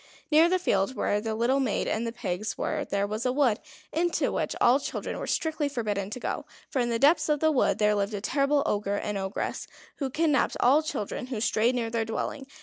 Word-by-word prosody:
Near 320 Hz, +3 st, +6 dB
the 370 Hz, -, +3 dB
field 205 Hz, -, 0 dB
where 205 Hz, -3 st, 0 dB
the 220 Hz, 0 st, -2 dB
little 245 Hz, +5 st, +2 dB
maid 250 Hz, -7 st, 0 dB
and 230 Hz, +2 st, -1 dB
the -, -, -2 dB
pigs 215 Hz, -3 st, -4 dB
were -, -, -1 dB
there 200 Hz, 0 st, -1 dB
was 215 Hz, +3 st, -3 dB
a 250 Hz, -, +1 dB
wood, 255 Hz, -4 st, +2 dB, 0.3 s
into 340 Hz, +1 st, +1 dB
which -, -, -2 dB
all 250 Hz, +3 st, +5 dB
children -, -, -4 dB
were -, -, -5 dB
strictly 310 Hz, -2 st, 0 dB
forbidden 210 Hz, -7 st, -2 dB
to 225 Hz, -, -6 dB
go. -, -, -3 dB, 0.3 s
For 265 Hz, -, 0 dB
in 240 Hz, -1 st, +1 dB
the 230 Hz, -, +1 dB
depths 295 Hz, +6 st, +4 dB
of 300 Hz, -1 st, +2 dB
the 315 Hz, +1 st, +3 dB
wood 275 Hz, -, +2 dB
there 210 Hz, 0 st, +3 dB
lived 205 Hz, +1 st, -1 dB
a -, -, -3 dB
terrible 280 Hz, +4 st, +2 dB
Ogre 205 Hz, -1 st, 0 dB
and 210 Hz, -, -3 dB
Ogress, 190 Hz, 0 st, -3 dB, 0.3 s
who 275 Hz, -3 st, -2 dB
kidnapped 300 Hz, +1 st, +1 dB
all 275 Hz, +5 st, +5 dB
children 260 Hz, -6 st, -4 dB
who 250 Hz, -4 st, -4 dB
strayed 230 Hz, +3 st, +2 dB
near 230 Hz, -2 st, -2 dB
their 230 Hz, -1 st, 0 dB
dwelling. 265 Hz, +4 st, -4 dB
240 Hz, 225 wpm, -27 LUFS, 210-285 Hz, 0.3 s, Near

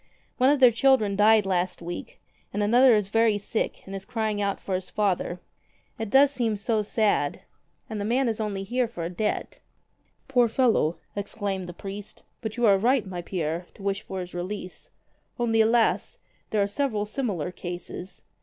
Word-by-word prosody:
One 255 Hz, +1 st, +5 dB
of 290 Hz, -1 st, +3 dB
their 250 Hz, -2 st, +8 dB
children 230 Hz, -4 st, +3 dB
died 210 Hz, +1 st, +5 dB
last 185 Hz, -1 st, 0 dB
week, 175 Hz, +1 st, -7 dB, 0.3 s
and 205 Hz, +1 st, -1 dB
another 240 Hz, +3 st, +6 dB
is 205 Hz, -2 st, 0 dB
very 225 Hz, -1 st, +3 dB
sick 205 Hz, +2 st, -3 dB
and 195 Hz, -, -8 dB
is 195 Hz, -1 st, -5 dB
crying 220 Hz, -2 st, -2 dB
out 200 Hz, -1 st, -1 dB
for 195 Hz, -, -5 dB
his 185 Hz, 0 st, -2 dB
father. 185 Hz, -3 st, 0 dB, 0.6 s
It 225 Hz, -2 st, -3 dB
does 275 Hz, +4 st, +6 dB
seem 235 Hz, -6 st, -1 dB
so 215 Hz, +1 st, 0 dB
sad. 205 Hz, -8 st, +1 dB, 0.5 s
And 215 Hz, -3 st, -4 dB
the -, -, -2 dB
man 250 Hz, +4 st, +2 dB
is 225 Hz, -1 st, -1 dB
only 205 Hz, -3 st, -2 dB
here 245 Hz, +5 st, 0 dB
for 175 Hz, -7 st, -6 dB
a 170 Hz, -, -3 dB
debt." 210 Hz, +4 st, -2 dB, 0.7 s
"Poor 245 Hz, -3 st, +4 dB
fellow!" 225 Hz, -, +2 dB, 0.2 s
exclaimed 200 Hz, -2 st, -3 dB
the -, -, -5 dB
priest. 200 Hz, +3 st, -8 dB, 0.2 s
"But 220 Hz, -1 st, -5 dB
you 240 Hz, -, +2 dB
are 200 Hz, -3 st, +5 dB
right, 245 Hz, +1 st, +2 dB
my 180 Hz, -2 st, -5 dB
Pierre, 170 Hz, -1 st, -3 dB
to 195 Hz, -, -13 dB
wish 195 Hz, -1 st, -1 dB
for 190 Hz, -1 st, -5 dB
his 180 Hz, 0 st, -8 dB
release. 180 Hz, +1 st, -5 dB, 0.5 s
Only, 225 Hz, -2 st, +2 dB
alas! 225 Hz, +1 st, +2 dB, 0.3 s
there 210 Hz, -2 st, +2 dB
are -, -, 0 dB
several 215 Hz, -1 st, -1 dB
similar 205 Hz, -, -2 dB
cases. 175 Hz, +1 st, -7 dB
210 Hz, 180 wpm, -26 LUFS, 190-230 Hz, 0.7 s, their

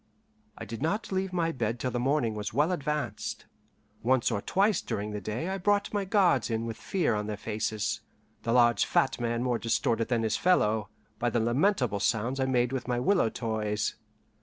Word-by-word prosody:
I -, -, -6 dB
did 115 Hz, -1 st, -7 dB
not 200 Hz, +9 st, -1 dB
leave 190 Hz, 0 st, -1 dB
my 170 Hz, -2 st, 0 dB
bed 115 Hz, -4 st, -2 dB
till 125 Hz, +2 st, -2 dB
the 120 Hz, -, -1 dB
morning 130 Hz, -3 st, +1 dB
was 105 Hz, 0 st, -5 dB
well 150 Hz, +6 st, +3 dB
advanced. 150 Hz, -6 st, -3 dB, 0.6 s
Once 130 Hz, +1 st, +2 dB
or 100 Hz, -3 st, -1 dB
twice 200 Hz, -, +2 dB
during 105 Hz, +1 st, -3 dB
the 105 Hz, 0 st, -4 dB
day 110 Hz, -, -3 dB
I 195 Hz, +1 st, -2 dB
brought 205 Hz, +3 st, +1 dB
my 205 Hz, -1 st, 0 dB
guards 185 Hz, -, +3 dB
in 115 Hz, 0 st, -1 dB
with 115 Hz, -1 st, -4 dB
fear 175 Hz, -, 0 dB
on 105 Hz, 0 st, -2 dB
their 105 Hz, -1 st, -3 dB
faces, 110 Hz, 0 st, -2 dB, 0.4 s
the 115 Hz, -, -2 dB
large 120 Hz, -3 st, +5 dB
fat -, -, +1 dB
man 120 Hz, 0 st, 0 dB
more 125 Hz, -2 st, 0 dB
distorted 115 Hz, 0 st, 0 dB
than 120 Hz, -2 st, 0 dB
his 110 Hz, -, +1 dB
fellow, 110 Hz, -, +2 dB, 0.3 s
by 120 Hz, -, +1 dB
the 120 Hz, -, 0 dB
lamentable 125 Hz, -, +1 dB
sounds 120 Hz, +5 st, 0 dB
I 130 Hz, -, +2 dB
made 125 Hz, -1 st, +2 dB
with 130 Hz, -2 st, -3 dB
my 120 Hz, -1 st, 0 dB
willow 180 Hz, -, +3 dB
toys. 110 Hz, -2 st, -2 dB
120 Hz, 195 wpm, -29 LUFS, 110-155 Hz, 0.6 s, large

